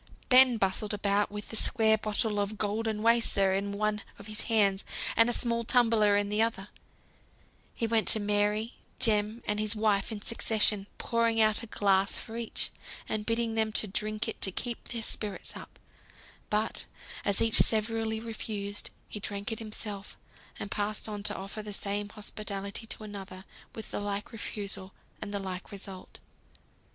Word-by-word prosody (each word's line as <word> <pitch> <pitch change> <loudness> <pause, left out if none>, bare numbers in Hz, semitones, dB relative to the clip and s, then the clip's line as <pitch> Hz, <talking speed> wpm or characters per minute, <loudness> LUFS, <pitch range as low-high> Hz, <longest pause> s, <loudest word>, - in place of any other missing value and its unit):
Ben 255 -2 +7
bustled 205 +1 0
about 205 0 +2
with 210 0 -7
the - - -5
square 220 -1 +4
bottle 215 0 -1
of 205 +1 -2
Goldenwasser 215 -1 +2
in 200 +1 -1
one 210 +1 0 0.2
of 200 - -11
his 215 0 -2
hands, 200 -3 +3 0.3
and 230 +2 +5
a - - +2
small 235 -1 0
tumbler 225 -4 +4
in 205 0 0
the 210 +1 +1
other; 215 -3 0 1.1
he 230 - 0
went 225 -1 +2
to 220 - +7
Mary, 210 +2 +1 0.2
Jem, 215 0 +1
and 210 0 0
his 215 +1 +2
wife 210 -1 +1
in 215 - -4
succession, 210 -2 +2
pouring 230 -1 +1
out 215 -1 +4
a 230 - -7
glass 195 -2 +2
for 225 - -7
each 235 -1 -3 0.4
and 215 -1 -2
bidding 230 0 +1
them 220 -1 +2
drink 215 +1 +1
it 225 - -4
to 190 - +4
keep 235 +5 -4
their 230 -2 -3
spirits 210 -2 -3
up: - - -10 0.7
but 215 +1 -1 0.4
as 200 -2 +2
each 225 -1 +4
severally 220 0 +2
refused, 215 -3 -3 0.2
he 210 - -5
drank 205 +2 -3
it 225 - -2
himself; 210 -2 -5 0.4
and 200 - -5
passed 210 +1 -1
on 210 -1 -4
to 205 - 0
offer 195 +3 -6
the 210 -1 -6
same 205 +1 -2
hospitality 210 0 -6
to 220 - -5
another 195 -2 -8 0.3
with 220 - -7
the - - -2
like 205 +1 -3
refusal, 200 -3 -4 0.3
and 205 - -4
the 205 - -1
like 190 -2 -5
result. 195 -2 -9
210 Hz, 165 wpm, -30 LUFS, 205-225 Hz, 1.1 s, Ben